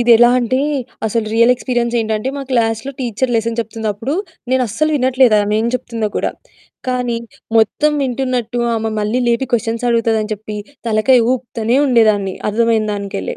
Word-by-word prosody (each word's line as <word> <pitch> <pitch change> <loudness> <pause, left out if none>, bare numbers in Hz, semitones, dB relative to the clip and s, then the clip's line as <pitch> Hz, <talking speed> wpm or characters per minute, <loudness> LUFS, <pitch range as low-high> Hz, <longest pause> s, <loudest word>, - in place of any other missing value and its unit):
ఇది 240 0 +2
ఎలా 240 +1 +6
అంటే 250 +1 0 0.5
అసలు 225 +1 0
రియల్ 235 +2 +5
ఎక్స్‌పీరియన్సేంటంటే 235 -2 -1
మా 280 - -4
క్లాస్‌లో 225 0 0
టీచరు 245 +1 -1
లెసన్ 230 +1 -1
చెప్తుందప్పుడు. 225 +3 -3 0.4
నేను 260 0 +3
అస్సల 290 +9 0
వినట్లేదు 255 -3 +3
ఆమేం 215 +2 0
చెప్తుందో 230 -3 -2
కూడా. - - 0 0.6
కానీ 250 -2 -1 0.4
మొత్తం 295 +7 +3
వింటున్నట్టు 250 -2 -2 0.2
ఆమె 225 0 -1
మళ్ళీ 210 +4 0
లేపి 235 +3 +1
క్వెషన్స్ 230 +1 0
అడుగుతదని 225 -2 +1
చెప్పి 210 0 -8 0.3
తలకాయ 225 +4 +4
ఊపుతానే 240 -1 -1
ఉండేదాన్ని 215 -6 +3 0.2
అర్థమైన 225 0 +2
దానికెళ్ళే. 200 - -4
230 Hz, 140 wpm, -17 LUFS, 220-250 Hz, 0.6 s, ఎలా